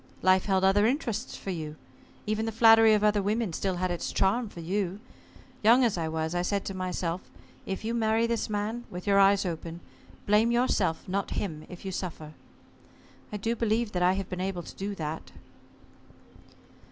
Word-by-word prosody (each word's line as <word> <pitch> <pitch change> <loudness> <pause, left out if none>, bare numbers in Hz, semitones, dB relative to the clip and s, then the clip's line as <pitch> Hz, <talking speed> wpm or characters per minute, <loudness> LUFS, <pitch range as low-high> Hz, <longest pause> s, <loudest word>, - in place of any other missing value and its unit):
Life 185 0 +4
held 190 -2 +1
other 200 +2 +4
interests 245 -4 -2
for 195 - -5
you. 155 -3 -5 0.5
Even 215 +1 -1
the - - -1
flattery 225 0 +7
of 210 - 0
other 210 -1 +3
women 210 -1 -1
still 190 +2 -1
had 180 0 -1
its 175 - -3
charm 215 +4 +1
for 175 - -11
you. 190 +3 -2 0.6
Young 235 +4 +6
as 235 -4 +2
I 165 -2 -2
was, 160 +1 -2
I 175 - 0
said 200 +2 -1
to 195 - -4
myself: 180 -1 -3 0.5
'If 195 +3 -4
you 230 - -1
marry 225 0 +2
this 230 -2 -1
man 215 +3 -3
with 180 0 -7
your 200 -1 +4
eyes 200 0 +5
open 165 -1 -5 0.5
blame 215 +3 +4
yourself, 215 -9 +1
not 195 +2 -2
him, 155 -6 -4
if 180 +2 -10
you 190 - -3
suffer.' 160 -4 -6 1.0
I 210 - -3
do 225 +3 -1
believe 225 0 0
that 180 - -2
I 180 +1 +4
have 195 -1 -3
been 180 -1 -5
able 185 -2 -3
to - - -11
do 200 +1 -4
that." 160 -2 -5
195 Hz, 190 wpm, -28 LUFS, 180-220 Hz, 1.0 s, flattery